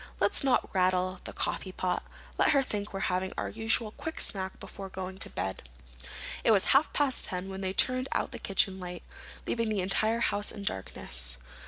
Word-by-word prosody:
"Let's - - +2
not 265 -2 +2
rattle 185 0 +2
the - - -5
coffeepot. 185 -1 -1 0.4
Let - - +5
her 275 -1 +5
think 210 -4 -2
we're 195 - -4
having 185 0 0
our - - -1
usual 220 0 +1
quick 320 +8 -5
snack 190 -2 +1
before 195 0 -7
going 190 0 -6
to - - -1
bed." 95 -10 -4 0.7
It - - +3
was 205 -4 +6
half 280 +3 +5
past 285 -3 +4
ten 180 +1 -3
when 190 0 -5
they 190 0 -1
turned 255 +5 +1
out - - 0
the 240 - -6
kitchen 195 -2 +1
light, 180 -1 -6 0.4
leaving 230 -1 0
the 210 -3 +1
entire 220 +5 +2
house 205 -2 +2
in 205 - -7
darkness. 65 - -3
195 Hz, 185 wpm, -30 LUFS, 185-225 Hz, 0.7 s, was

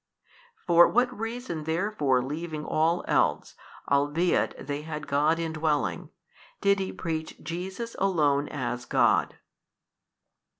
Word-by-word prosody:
For 175 -1 +7
what 245 +1 +1
reason 225 -7 -5
therefore 160 -7 +1
leaving 155 +2 -5
all 165 +3 +1
else - - +1 0.3
albeit 145 +5 +1
they 145 +1 -3
had 150 -1 -6
God 150 +3 +2
indwelling, 155 - -1 0.5
did 200 0 +3
he 190 - -2
preach 160 -2 -4
Jesus 190 +7 -5
Alone 150 -7 +2
as 125 -3 -4
God? - - +2
160 Hz, 110 wpm, -27 LUFS, 145-180 Hz, 0.5 s, For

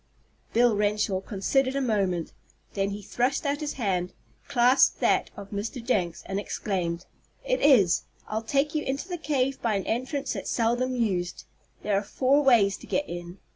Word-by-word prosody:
Bill 235 -1 +4
Renshaw 205 -2 +1
considered 260 +7 0
a - - +1
moment. 195 -9 0 0.4
Then 195 -1 0
he 200 +1 -6
thrust 250 +8 -1
out 285 +1 0
his 300 -1 -3
hand, 185 -7 -1 0.3
clasped 250 +1 +4
that - - +2
of 200 -1 -9
Mr. 210 +5 -4
Jenks, 200 -9 -1
and 195 +1 -2
exclaimed: 180 -4 -3 0.4
"It - - 0
is. 225 -12 +5 0.2
I'll 220 +1 -2
take 275 +6 0
you 305 - 0
into 275 +6 -3
the 355 -2 -4
cave 275 -3 0
by 225 -3 +1
an 195 - -2
entrance 260 +5 -2
that's - - -5
seldom 245 +2 +1
used. 190 -7 -1 0.4
There 210 - 0
are 195 - +2
four 265 +7 +2
ways 220 -9 +4
to - - -13
get 290 - -1
in. 175 +1 -7
225 Hz, 175 wpm, -27 LUFS, 195-270 Hz, 0.4 s, is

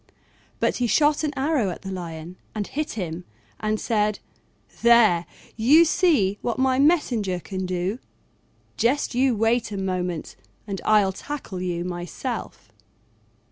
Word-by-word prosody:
But - - +1
he 245 - +1
shot 295 +5 +3
an 305 - 0
arrow 270 -6 +1
at 180 - -7
the 195 - -5
Lion 170 -1 -6 0.2
and 210 -1 -2
hit 305 +7 -3
him, 180 -4 -4 0.4
and 215 0 -1
said, 210 -2 0 0.6
"There, 225 -8 +5 0.3
you 285 +9 +6
see 295 - +2
what 240 - -2
my 260 0 +2
messenger 245 - +2
can 185 +1 -5
do: 185 +5 -2 0.8
just 260 +5 +1
you 255 0 +2
wait 225 +1 +1
a 200 - -4
moment 180 -3 -3 0.3
and 195 -3 -5
I'll 205 -3 +4
tackle 205 -5 -6
you 175 -1 -2
myself." 180 +8 -5
215 Hz, 140 wpm, -24 LUFS, 185-260 Hz, 0.8 s, you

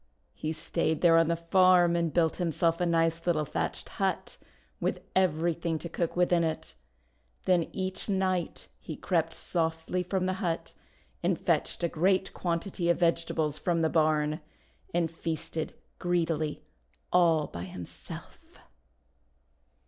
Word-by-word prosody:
He 155 - -3
stayed 160 0 -1
there 170 -2 +6
on 165 -1 +5
the 170 - +2
farm 175 0 +4
and 170 -2 +1
built 165 -1 +2
himself 170 -1 +1
a 175 - +2
nice 165 0 +1
little 155 -3 +2
thatched - - -3
hut - - -2 0.4
with - - -1
everything 170 -2 +1
to 170 - -6
cook 170 0 -2
with 180 0 +2
in 170 -1 +4
it. 160 -1 -3 0.7
Then 180 -3 +3
each 190 +2 -3
night 185 -3 -1
he 155 - -7
crept 165 -1 0
softly 165 +1 -2
from 185 +1 -1
the 185 - +1
hut, 170 -3 -2 0.5
and - - +1
fetched - - 0
a - - +4
great 185 +4 +1
quantity 170 0 -1
of 170 - +4
vegetables 165 -3 +1
from 170 -2 +1
the 160 - +2
barn, 155 -1 +2 0.5
and 170 -2 +1
feasted 165 -1 -4 0.2
greedily 165 -4 0 0.5
all 165 -4 +4
by 85 -7 -6
himself. 90 -1 -10
170 Hz, 140 wpm, -29 LUFS, 160-175 Hz, 0.7 s, there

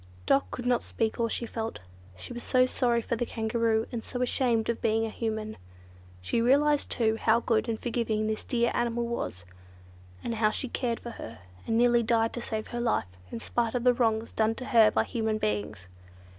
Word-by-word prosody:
Dot 275 0 +3
could 245 - -6
not 245 -1 +2
speak 225 0 -2
all 230 - +2
she 235 - -2
felt. 225 -1 -4 0.4
She 170 - -7
was 240 - -6
so 255 0 +3
sorry 240 -2 +1
for 235 - -1
the 235 - -1
Kangaroo, 225 -1 0
and 235 -3 -4
so 250 0 -3
ashamed 240 -3 +1
of 235 - -1
being 225 0 +2
a 220 - -4
Human. 220 -1 -3 0.6
She 165 - 0
realised 285 +4 +3
too, 225 -2 +1
how 225 +1 +3
good 230 -1 +1
and 225 - -1
forgiving 230 -3 -1
this 215 0 -2
dear 240 -2 +1
animal 235 0 0
was; 160 - -4 0.8
how 225 -2 +1
she 245 +4 -3
had - - -22
cared 235 -3 -1
for 235 - -7
her, 115 - -9 0.3
and 225 - +1
nearly 240 0 +4
died 225 0 +1
to 240 - -4
save 220 -2 -4
her 240 0 -3
life, 225 - 0 0.2
in - - -4
spite 230 - -1
of 245 - 0
the 250 0 +5
wrongs 225 -2 0
done 220 0 +1
to 255 - -6
her 225 -3 +6
by - - +1
human 220 -2 -1
beings. 105 - -3
230 Hz, 205 wpm, -28 LUFS, 220-240 Hz, 0.8 s, her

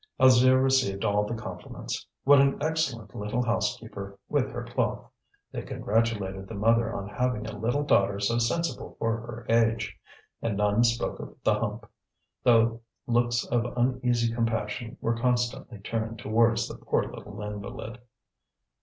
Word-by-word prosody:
Alzire 130 0 +6
received 130 -8 +2
all 105 0 +2
the 115 - -3
compliments. 110 - -6 0.2
What 140 0 +7
an 140 0 +3
excellent 140 -9 -1
little 105 +4 -2
housekeeper, 100 -4 -2
with - - +1
her - - -5
cloth! - - -2 0.4
They - - -4
congratulated 100 -4 -1
the 115 - -7
mother 115 +2 +3
on 100 - -4
having 115 +1 -1
a 110 - -6
little 120 +7 0
daughter 100 -7 +3
so 115 +4 +1
sensible 165 +9 -1
for 115 0 0
her 120 0 -8
age. 115 -1 +2 0.5
And 110 -4 -1
none 105 +2 +3
spoke 115 0 0
of - - -8
the - - +4
hump, - - -3 0.6
though 115 -1 +4 0.2
looks 120 0 +1
of 120 -1 +1
uneasy 120 -2 +1
compassion 115 +1 -2
were 115 - +1
constantly 120 -1 0
turned 110 +2 -3
towards 115 +2 +2
the - - -9
poor - - +1
little - - -9
invalid. 105 +3 -6
115 Hz, 145 wpm, -27 LUFS, 105-120 Hz, 0.6 s, What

